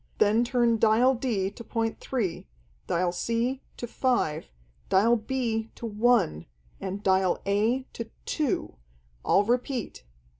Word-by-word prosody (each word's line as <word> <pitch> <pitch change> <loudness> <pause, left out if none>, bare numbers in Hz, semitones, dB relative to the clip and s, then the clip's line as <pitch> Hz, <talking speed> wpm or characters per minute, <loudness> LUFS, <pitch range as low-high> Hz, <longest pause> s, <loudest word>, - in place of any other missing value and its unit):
Then 215 +3 +4
turn 240 -2 +2
Dial 230 +4 +4
D 225 -7 -1
to 235 - -10
point 225 -1 -2
3, 215 -10 -3 0.4
Dial 175 +1 +1
C 235 +8 -1 0.2
to - - -4
5, 240 - 0 0.4
Dial 215 +5 +4
B 225 -1 -2
to - - -7
1, 215 - +2 0.3
and 195 +1 -5
Dial 190 -1 +2
A 215 +6 +1
to 230 -1 -6 0.2
2. 290 - -1 0.5
I'll 200 - +4
repeat.... 240 - -2
225 Hz, 125 wpm, -27 LUFS, 200-245 Hz, 0.5 s, Then